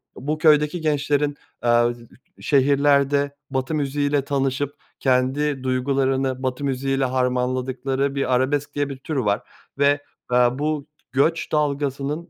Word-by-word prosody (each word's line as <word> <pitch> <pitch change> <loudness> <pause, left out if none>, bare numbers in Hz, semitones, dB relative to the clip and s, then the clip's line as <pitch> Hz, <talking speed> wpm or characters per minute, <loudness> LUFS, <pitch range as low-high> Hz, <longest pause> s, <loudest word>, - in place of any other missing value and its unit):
bu 150 +4 -3
köydeki 155 +1 +3
gençlerin, 145 -1 0 0.2
aaa, 120 0 +4 0.5
şehirlerde 140 0 +3 0.2
Batı 130 +3 -1
müziği 145 0 0
ile 145 -1 +2
tanışıp 140 0 -1 0.2
kendi 135 +2 +1
duygularını 130 0 0
Batı 130 +2 -2
müziği 135 0 -1
ile 135 - +2
harmanladıkları 130 +2 -1
bir 135 -2 0
arabesk 140 +3 0
diye 145 -1 0
bir 135 - -6
tür 150 +4 -5
var 105 -6 +1 0.4
ve, 145 +1 +3 0.3
eee, 125 0 +5
bu 150 -1 -1 0.3
göç 160 +4 +1
dalgasının 145 +1 -1
140 Hz, 125 wpm, -22 LUFS, 130-145 Hz, 0.5 s, eee